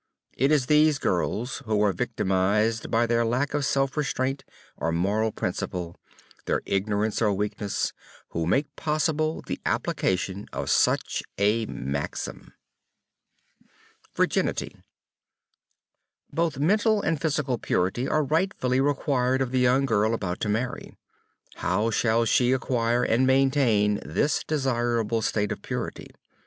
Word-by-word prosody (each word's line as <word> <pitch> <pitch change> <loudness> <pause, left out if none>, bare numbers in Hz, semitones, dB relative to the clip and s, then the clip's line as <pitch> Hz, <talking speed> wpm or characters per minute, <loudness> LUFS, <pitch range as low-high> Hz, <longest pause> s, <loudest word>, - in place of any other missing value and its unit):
It 135 +4 +2
is 145 -4 +3
these 150 +1 +4
girls, 110 +3 -1
who 110 -1 +1
are 100 -2 +2
victimized 100 +6 0
by 115 +1 +2
their 115 0 +2
lack 125 +6 0
of 145 -1 0
self 135 0 0
restraint 135 -2 -1 0.3
or 80 - -2
moral 100 +6 +1
principle, 90 -4 -4 0.5
their - - 0
ignorance 105 +3 0
or 105 -2 +3
weakness, 105 0 -2 0.4
who 80 -1 -2
make 140 - 0
possible 155 0 0
the - - -5
application 95 +2 -1
of 70 +1 -3
such - - +2 0.2
a 105 +3 +2
maxim. 70 +2 -5 1.6
VIRGINITY - - 0 1.6
Both 160 -2 0
mental 210 +7 +2
and 160 -2 0
physical 140 -6 0
purity 95 +9 0
are 155 - +2
rightfully 145 -5 +1
required 135 -2 +1
of 130 -2 -1
the 130 - +1
young 125 +2 +3
girl 110 -2 +2
about 95 -4 -3
to 105 - -2
marry. 125 +4 -3 0.6
How 105 +5 0
shall 115 +1 +2
she 125 +2 +3
acquire 120 -2 +1
and 125 +3 +2
maintain 130 -6 +3
this 80 - 0
desirable 120 -6 0
state 105 -1 0
of - - -4
purity? - - -5
120 Hz, 125 wpm, -26 LUFS, 105-135 Hz, 1.6 s, these